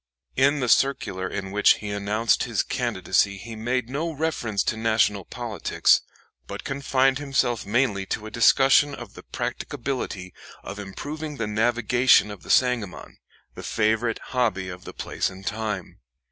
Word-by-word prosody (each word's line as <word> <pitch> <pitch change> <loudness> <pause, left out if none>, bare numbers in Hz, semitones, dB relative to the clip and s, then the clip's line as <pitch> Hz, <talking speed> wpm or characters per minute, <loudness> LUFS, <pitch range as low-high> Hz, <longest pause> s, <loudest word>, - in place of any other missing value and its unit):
In 140 +2 +3
the 125 - 0
circular 115 -8 +2
in 95 -1 -5
which 105 +1 +5
he 105 -1 -6
announced 105 +2 +1
his - - 0
candidacy 100 -1 0
he 115 +3 -8
made 120 +2 -1
no 150 +6 -2
reference 140 -9 -1
to - - -1
national 110 -3 +1
politics, 115 -7 +1 0.5
but - - -7
confined 135 -1 +1
himself 130 -6 0
mainly 105 -4 +1
to 105 - -3
a 110 - -7
discussion 135 +4 +5
of - - -10
the - - -11
practicability 115 -8 -4 0.3
of 100 - -7
improving 145 +10 -6
the 115 - -1
navigation 115 +1 +3
of 100 -3 -9
the - - -14
Sangamon, 125 -7 +1 0.3
the - - -9
favorite 110 +1 0 0.2
hobby 110 -7 0
of 90 0 -9
the - - -8
place - - -2
and 95 +1 -12
time. 105 -4 -4
115 Hz, 150 wpm, -25 LUFS, 100-130 Hz, 0.5 s, which